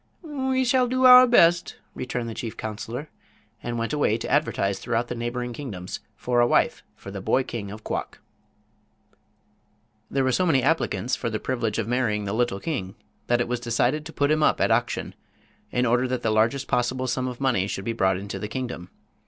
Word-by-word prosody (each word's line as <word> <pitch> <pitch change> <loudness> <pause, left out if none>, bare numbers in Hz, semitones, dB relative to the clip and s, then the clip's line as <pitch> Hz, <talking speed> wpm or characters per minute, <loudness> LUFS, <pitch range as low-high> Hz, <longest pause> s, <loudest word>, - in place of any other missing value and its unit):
"We 265 -4 -1
shall 250 0 +3
do 255 +1 +1
our 250 0 +10
best," 175 -7 +4 0.2
returned 125 -2 -4
the 115 - -5
chief 115 0 -6
counselor, 115 +7 -6 0.5
and 120 0 -4
went 115 +4 -2
away 145 -7 +2
to 115 - -5
advertise 100 -9 +1
throughout 120 0 -1
the - - -2
neighboring 120 +1 -3
kingdoms 105 -10 -6 0.2
for 125 -1 0
a 120 - +5
wife - - +2
for 100 - -10
the 100 -1 -6
boy 130 +7 +2
king 110 -5 -6
of 105 +2 -9
Quok. - - -4 1.9
There 135 - 0
were 130 - +2
so 180 +8 +1
many 135 -6 +3
applicants 130 - +1
for 115 - -3
the 110 -1 -3
privilege 115 -4 -2
of 115 -2 -1
marrying 115 -4 0
the 100 - -3
little 115 -4 0
king 100 - -4 0.3
that 120 0 +2
it - - -1
was 125 0 -2
decided 120 +6 0
to - - -9
put 145 -1 +1
him 155 0 +2
up - - +3
at - - +2
auction, - - 0 0.6
in 125 0 0
order 125 +2 +2
that 125 -1 -3
the 110 - +1
largest 115 +5 +1
possible 130 +1 0
sum 130 +1 -1
of 125 -1 -6
money 120 -8 +1
should 95 -1 -5
be 115 - -1
brought 95 -4 +2
into 100 +2 -6
the 105 - -4
kingdom. 120 -6 -5
120 Hz, 200 wpm, -25 LUFS, 110-140 Hz, 1.9 s, our